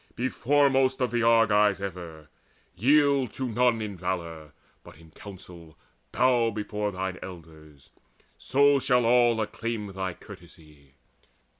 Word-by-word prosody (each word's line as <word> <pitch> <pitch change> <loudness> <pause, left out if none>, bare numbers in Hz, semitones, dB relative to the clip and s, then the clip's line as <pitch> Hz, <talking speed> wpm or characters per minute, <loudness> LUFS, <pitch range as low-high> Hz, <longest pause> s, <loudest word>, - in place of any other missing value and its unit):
Be 130 +2 -2
foremost 135 0 +1
of 125 -2 -1
the 120 -1 0
Argives 105 -3 +3
ever; 85 -5 -8 0.5
yield 140 +4 +2
To 130 - -4
none 120 -1 +1
in 105 -2 -6
valour, 85 -4 -5 0.3
but - - -15
in 80 0 -18
council 90 -4 -13 0.3
bow 125 -3 +2
Before 105 -1 -4
thine 95 -1 -5
elders: 80 -5 -13 0.4
so 140 +1 +2
shall 125 -2 +1
all 120 -1 +3
acclaim 110 -1 -4
Thy 95 -2 -4
courtesy. 75 -4 -16
105 Hz, 125 wpm, -26 LUFS, 90-125 Hz, 0.5 s, Argives